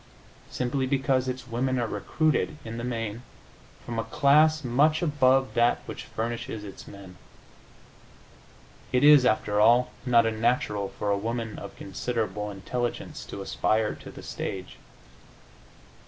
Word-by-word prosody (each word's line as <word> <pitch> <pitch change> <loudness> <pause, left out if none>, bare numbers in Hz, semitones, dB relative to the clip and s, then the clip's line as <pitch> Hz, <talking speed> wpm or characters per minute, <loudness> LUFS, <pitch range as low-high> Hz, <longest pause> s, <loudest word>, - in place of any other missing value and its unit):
Simply 130 +1 -1
because 135 -1 +1
its 130 -1 -4
women 130 +2 -1
are 120 - 0
recruited, 150 +9 0
in 115 +1 -5
the - - -5
main, 115 -2 -3 0.6
from 115 -1 -3
a - - 0
class 155 +4 +4
much 145 +7 +2
above 135 -4 +3
that 120 0 +2
which - - -7
furnishes 115 -1 -4
its 100 -2 -10
men. 95 -2 -12 1.7
It 125 +1 +2
is, 145 -3 +8
after 105 -2 +1
all, 120 +3 +5
not 120 -2 +4
unnatural 110 -3 0
for 105 - -3
a 100 - +2
woman 115 +1 -4
of 100 - -9
considerable 105 +1 -3
intelligence 120 +5 -4
to 100 - -7
aspire 110 +2 0
to - - -11
the - - -11
stage. 95 -1 -6
120 Hz, 135 wpm, -27 LUFS, 105-130 Hz, 1.7 s, is